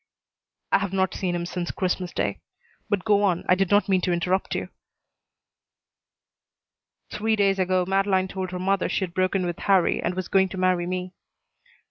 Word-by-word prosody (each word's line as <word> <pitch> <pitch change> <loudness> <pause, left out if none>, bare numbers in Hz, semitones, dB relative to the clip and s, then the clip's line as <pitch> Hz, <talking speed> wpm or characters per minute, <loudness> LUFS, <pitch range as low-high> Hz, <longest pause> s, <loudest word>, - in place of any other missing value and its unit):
"I - - +5
have 195 -1 -3
not 190 -1 +1
seen 180 -2 -2
him 170 0 -2
since 175 0 -4
Christmas 180 -1 -2
day. - - -2 0.5
But 200 -3 -1
go 205 -2 +4
on. 185 -4 +1
I - - +5
did 190 0 +1
not 205 +1 +3
mean 190 -2 +2
to 180 - 0
interrupt 180 +2 0
you." - - -3 2.4
"Three 220 +1 0
days 195 -2 +2
ago 185 -1 +1
Madeleine 195 -1 +2
told 190 -1 -4
her 180 - -5
mother 190 +1 0
she'd 185 -3 -2
broken 185 +1 0
with 175 -1 -4
Harrie 190 -3 +2
and 180 - -2
was 185 -1 -3
going 190 -1 +3
to 190 - -7
marry 185 -1 +1
me." 180 0 -4
185 Hz, 175 wpm, -25 LUFS, 180-195 Hz, 2.4 s, I